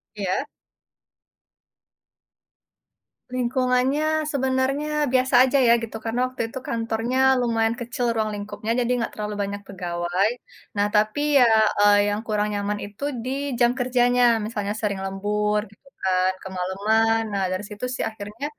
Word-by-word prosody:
Iya? 195 +5 -1 2.8
Lingkungannya 255 +5 +1
sebenarnya 265 +2 0 0.2
biasa 260 0 +2
aja 265 +2 +1
ya 235 - +7
gitu, 220 -1 -5
karena 235 +2 -1
waktu 255 - -6
itu 260 - -6
kantornya 230 +2 -2 0.2
lumayan 230 -2 +1
kecil 245 +1 -3
ruang 220 -1 0
lingkupnya, 210 +2 -5
jadi 245 0 0
enggak 230 - -3
terlalu 210 0 -4
banyak 200 0 -5
pegawai. 180 +1 -1 0.5
Nah, 205 0 +2
tapi 215 +7 +2 0.2
ya, 250 - +7 0.3
eee, 205 0 +6
yang 205 - -1
kurang 210 -1 0
nyaman 205 0 -2
itu, 205 +6 -11 0.2
di 255 - -3 0.3
jam 240 0 +5
kerjanya, 245 0 +2 0.2
misalnya 210 -2 -3
sering 200 -2 -1
lembur 210 +2 0
gitu 240 +6 -23
kan, 185 0 +2
kemaleman. 205 +5 +1
Nah, 195 -1 0
dari 185 +2 -2
situ 210 +3 -5
sih - - -2
akhirnya 210 +5 -7
220 Hz, 135 wpm, -23 LUFS, 205-250 Hz, 2.8 s, ya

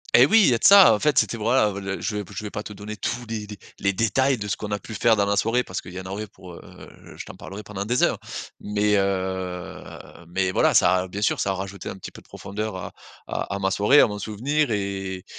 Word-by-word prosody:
Et 125 +3 +8
oui, 225 +7 +6
il - - +5
y - - +3
a 115 - +1
de - - -15
ça, 200 0 +9
en 105 - 0
fait, 150 -3 +1
c'était 115 - +2
voilà, 110 0 +2
heu, 100 - -6
le 95 0 -4
je 105 -2 -3
vais 105 - -3
je 105 - -5
vais 105 - -6
pas 105 - -4
te 105 - -9
donner 105 +1 -7
tous 120 +5 -3
les 110 -2 -5
dé 105 -1 -9 0.2
les 100 0 +1
détails 125 +6 +1
de 105 -1 -5
ce 95 - -1
qu'on 105 - -6
a 105 - -1
pu 110 - -10
faire 115 +1 +3
dans 100 -1 +1
la 100 0 +1
soirée 115 +4 +1
parce 95 - -5
qu'il 90 - -11
y 95 - -6
en 95 - -9
aurait 100 +3 -5
pour, 90 -2 -13
heu, - - -14
je - - -7
t'en - - -10
parlerai 100 +2 -9
pendant 100 -1 -5
des 120 +4 0
heures. - - +2 0.4
Mais, 105 0 +1
heu, 95 -2 -2 0.5
mais 95 +2 -1
voilà, - - +2
ça 95 - +5
a 90 +1 -2
bien 100 +3 -5
sûr - - +1
ça 95 - 0
a - - +1
rajouté 95 +1 -6
un - - -6
petit - - -9
peu - - -13
de - - -26
profondeur 105 +1 -5
à 95 - -6 0.3
à 100 - -4
à - - -2
ma 95 -1 0
soirée, 105 +9 +5
à - - +5
mon 105 -1 -6
souvenir 130 +8 -1
et 95 -2 -3
105 Hz, 280 wpm, -24 LUFS, 95-110 Hz, 0.5 s, ça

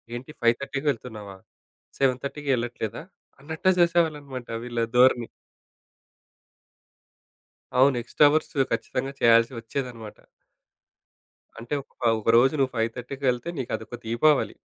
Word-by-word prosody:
ఏంటి 130 +5 -8
5:30కి 135 +5 +1
ఎళ్తున్నావా? 105 -5 -10 0.6
7:30కి 140 +2 -1
ఎళ్ళట్లేదా? 120 +2 -4 0.4
అన్నట్టే 160 +5 -1
జేసేవాళ్ళన్నమాట 150 -7 +1 0.2
వీళ్ళ 120 -1 -4 0.2
ధోరణి. 125 -2 +5 2.5
అవును. 130 +1 +5
ఎక్స్‌ట్రా 145 +5 +4
అవర్స్ 155 +1 0 0.2
ఖచ్చితంగా 130 +4 -2
చేయాల్సి 115 +1 +5
వచ్చేదనమాట. 115 -2 -6 1.4
అంటే 120 +5 -4
ఒక - - -25 0.2
ఒకరోజు 115 +4 +4
నువ్వు 135 -2 +1
5 115 0 +1
థర్టీకెళ్తే 125 +1 -2
నీకదొక 120 -2 -4
దీపావళి, 135 +6 +2
125 Hz, 95 wpm, -25 LUFS, 115-140 Hz, 2.5 s, ధోరణి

